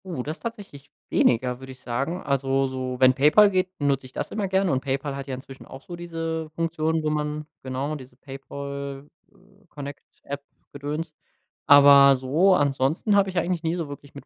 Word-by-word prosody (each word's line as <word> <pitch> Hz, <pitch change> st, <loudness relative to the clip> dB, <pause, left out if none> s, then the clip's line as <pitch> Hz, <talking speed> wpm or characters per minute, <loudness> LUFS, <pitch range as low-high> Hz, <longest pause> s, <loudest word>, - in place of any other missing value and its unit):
Oh, 170 Hz, -9 st, -4 dB
das 155 Hz, +5 st, -5 dB
ist -, -, -18 dB
tatsächlich 205 Hz, -, -8 dB, 0.2 s
weniger, 125 Hz, +1 st, +2 dB
würde 130 Hz, 0 st, -10 dB
ich 130 Hz, -, -18 dB
sagen. 135 Hz, +9 st, -3 dB
Also 135 Hz, -1 st, +1 dB
so, 130 Hz, -1 st, -4 dB
wenn 130 Hz, 0 st, +6 dB
PayPal 150 Hz, +10 st, +5 dB
geht, 185 Hz, 0 st, -1 dB
benutze 140 Hz, -2 st, 0 dB
ich 130 Hz, -, -20 dB
das -, -, -4 dB
immer 205 Hz, -2 st, -2 dB
gerne 190 Hz, -1 st, +1 dB
und 130 Hz, -1 st, 0 dB
PayPal 135 Hz, +1 st, -2 dB
hat 140 Hz, 0 st, -6 dB
ja 130 Hz, -, -3 dB
inzwischen 135 Hz, +1 st, -12 dB
auch 135 Hz, 0 st, -11 dB
so 175 Hz, -, -8 dB
diese 165 Hz, -2 st, -4 dB
Funktion, 160 Hz, -1 st, -1 dB
wo 155 Hz, -, 0 dB
man 150 Hz, 0 st, -2 dB, 0.2 s
genau, 135 Hz, +3 st, -3 dB
diese 130 Hz, -3 st, -11 dB
PayPal-Connect-App 140 Hz, +3 st, -9 dB, 0.3 s
Gedöns, 150 Hz, +3 st, -5 dB, 0.5 s
aber 140 Hz, -1 st, +8 dB
so, 155 Hz, +9 st, +3 dB
ansonsten 145 Hz, -, +1 dB
habe 195 Hz, -1 st, +3 dB
ich 185 Hz, -, -6 dB
eigentlich 175 Hz, -1 st, 0 dB
nie 165 Hz, +1 st, 0 dB
so 165 Hz, -4 st, -4 dB
wirklich 145 Hz, 0 st, -11 dB
mit 140 Hz, -, -10 dB
145 Hz, 180 wpm, -24 LUFS, 135-165 Hz, 0.5 s, aber